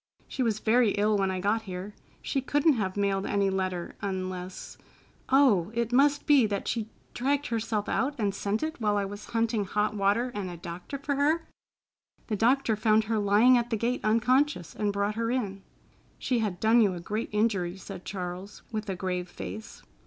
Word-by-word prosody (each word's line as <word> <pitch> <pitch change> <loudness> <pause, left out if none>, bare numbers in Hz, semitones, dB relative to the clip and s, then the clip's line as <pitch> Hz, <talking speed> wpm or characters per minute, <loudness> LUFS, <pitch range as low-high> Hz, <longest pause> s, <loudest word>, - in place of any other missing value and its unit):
She 265 - -4
was 225 -4 +1
very 225 0 +3
ill 210 +1 +2
when 195 -1 +1
I 185 -1 -2
got 205 +4 +1
here. 190 0 -7 0.3
She 270 - -1
couldn't 290 +4 +3
have 205 -5 -2
mailed 200 -1 0
any 200 -1 +1
letter, 185 -2 -3
unless—— 185 -2 -5 0.5
Oh, 250 -10 +4
it 235 0 -1
must 285 +2 +3
be 280 -7 +5
that 200 -1 -3
she 225 -2 -2 0.2
dragged 280 +3 0
herself 220 -2 -1
out 265 +7 0
and 205 -4 0
sent 205 +5 -2
it 315 -5 -4
while 210 -1 +2
I 200 - 0
was 205 +1 -8
hunting 225 -2 0
hot 210 +2 0
water 205 +5 +1
and 200 -3 -4
a 175 - -7
doctor 175 +10 -7
for 280 +1 -2
her? 310 +4 +1 0.8
The 215 - -2
doctor 235 +2 +2
found 215 0 +3
her 220 0 -1
lying 210 +5 +5
at 240 0 -3
the 225 - 0
gate 240 +3 -1
unconscious, 240 - +2
and 210 -1 0
brought 200 +1 -1
her 230 +1 -2
in." 205 -6 -2 0.6
"She 250 -2 0
had 200 -5 -2
done 225 +3 +5
you 200 -4 +2
a - - -6
great 210 +6 -3
injury," 200 -4 0
said 190 -1 -9
Charles, 185 +1 -6
with 215 -2 -4
a 190 - -1
grave 180 -1 -3
face. 215 +4 -8
210 Hz, 190 wpm, -28 LUFS, 195-235 Hz, 0.8 s, be